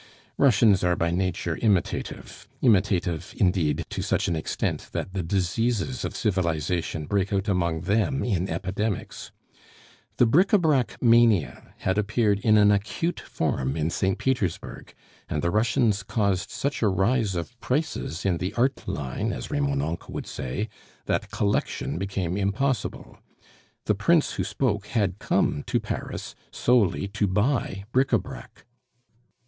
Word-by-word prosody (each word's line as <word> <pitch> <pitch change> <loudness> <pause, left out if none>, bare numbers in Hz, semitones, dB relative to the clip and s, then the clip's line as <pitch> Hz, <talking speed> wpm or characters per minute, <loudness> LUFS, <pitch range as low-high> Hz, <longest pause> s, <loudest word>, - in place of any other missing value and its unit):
Russians 110 -8 +5
are 90 0 +3
by 85 0 0
nature 90 -2 -1
imitative; 100 -6 -1 0.2
imitative 95 -7 +2
indeed 85 -4 +1
to - - -3
such - - 0
an 85 - 0
extent 80 - -3
that 95 - -3
the 95 - -1
diseases 100 +7 -1
of - - -4
civilization 85 -5 -1
break 100 +3 0
out 100 0 0
among 85 -5 0
them 110 +9 +1
in 95 -5 0
epidemics. 100 +2 -3 0.9
The - - +5
bric 175 - +3
a - - +8
brac 150 -8 +1
mania 115 -7 +3
had 95 +2 +1
appeared 105 -1 +1
in 110 +1 +4
an 105 0 +6
acute 110 - -1
form 65 +3 -2
in 80 +1 0
St. 95 +2 0
Petersburg, 120 -11 -2 0.4
and 75 - -2
the 85 - +1
Russians 110 -1 +2
caused 100 0 0
such 140 +5 -3
a 110 - +3
rise 100 +2 +1
of 90 +8 -5
prices 130 - -2
in 90 -4 +1
the 90 - -3
"art 130 +3 0
line," 70 -3 -2
as - - -6
Remonencq 70 +3 -1
would - - -5
say, 65 - -4 0.4
that - - -1
collection 100 -4 -1
became 95 -2 -2
impossible. 100 +6 -2 0.7
The - - +3
prince 150 +11 +2
who - - -2
spoke 105 -6 -1
had 100 -4 0
come 75 - +1
to - - +1
Paris - - -5 0.2
solely 110 -6 +2
to 105 0 0
buy 105 0 0
bric 130 +2 +2
a - - +5
brac. 125 -4 -10
100 Hz, 145 wpm, -25 LUFS, 90-115 Hz, 0.9 s, a